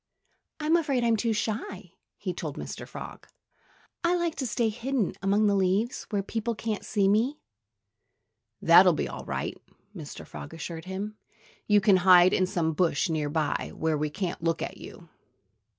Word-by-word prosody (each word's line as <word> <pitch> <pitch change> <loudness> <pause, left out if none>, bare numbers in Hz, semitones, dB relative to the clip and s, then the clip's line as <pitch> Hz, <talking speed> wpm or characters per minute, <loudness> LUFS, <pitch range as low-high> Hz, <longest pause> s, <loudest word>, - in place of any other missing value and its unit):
"I'm 310 +2 +2
afraid 275 -7 0
I'm 230 -1 +3
too 230 +1 0
shy," 210 -4 -3 0.3
he 185 -3 -3
told 155 -4 -5
Mr. - - -6
Frog. - - -9 0.8
"I 345 +1 +3
like 345 -2 0
to 260 - -2
stay 235 0 +1
hidden 240 -1 -1
among 200 +3 +2
the 205 - +3
leaves, 195 +5 0
where 205 -3 -1
people 230 +3 -3
can't 215 -1 -3
see 200 -2 +1
me." 230 +9 +2 1.3
"That'll - - +8
be - - -2
all - - -7
right!" - - -3 0.4
Mr. - - -8
Frog 70 - -9
assured 165 +1 -6
him. 200 +3 -5 0.5
"You 210 -1 +5
can 195 -2 +5
hide 180 0 +6
in 185 - +2
some 165 -3 0
bush 170 +1 +1
near 155 -2 -1
by, 155 0 -1
where 160 -1 0
we 150 0 -1
can't 175 +1 -4
look 165 0 0
at - - -6
you." - - -11
200 Hz, 165 wpm, -27 LUFS, 175-230 Hz, 1.3 s, That'll